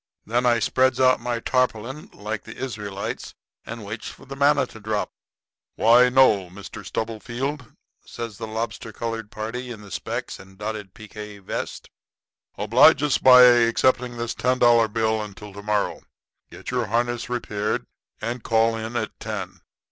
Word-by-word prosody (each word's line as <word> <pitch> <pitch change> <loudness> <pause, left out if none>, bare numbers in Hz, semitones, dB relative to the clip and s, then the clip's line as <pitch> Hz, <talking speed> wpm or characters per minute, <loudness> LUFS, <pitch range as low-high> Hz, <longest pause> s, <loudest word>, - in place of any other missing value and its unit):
"Then 120 +3 +1
I 120 -1 +4
spreads 130 +3 +2
out 130 -1 +5
my 120 0 -2
tarpaulin, 125 +3 -1
like 105 +1 -5
the 110 - -10
Israelites, 105 -6 -5 0.3
and 115 -2 -7
waits 110 +3 -6
for - - -14
the 135 +1 -8
manna 140 +1 +3
to 110 - -13
drop. 105 0 -2 0.6
"'Why, 120 +3 +6
no, 110 -8 +4
Mr. 95 +3 -10
Stubblefield,' 120 +4 -4 0.3
says 115 -3 -7
the 110 - -5
lobster 110 0 -4
colored 115 -1 -4
party 120 +3 -5
in 115 -3 -8
the 100 -2 -13
specs 80 - -4
and 95 0 -15
dotted 105 -2 -5
pique 105 -1 -9
vest; - - -5 0.7
'oblige 120 +9 +5
us 145 -2 +2
by 125 -1 +9
accepting 120 +1 +4
this 115 0 -2
ten 130 +1 +1
dollar 120 -2 +5
bill 110 0 0
until 105 -1 -9
to 100 - -8
morrow. 105 0 -1 0.5
Get - - -8
your - - 0
harness 120 +2 -1
repaired 105 -4 -2 0.3
and 120 +2 -4
call 115 0 +2
in 110 +1 -5
at 110 -2 -1
ten. 95 -5 -6
115 Hz, 155 wpm, -24 LUFS, 105-125 Hz, 0.7 s, by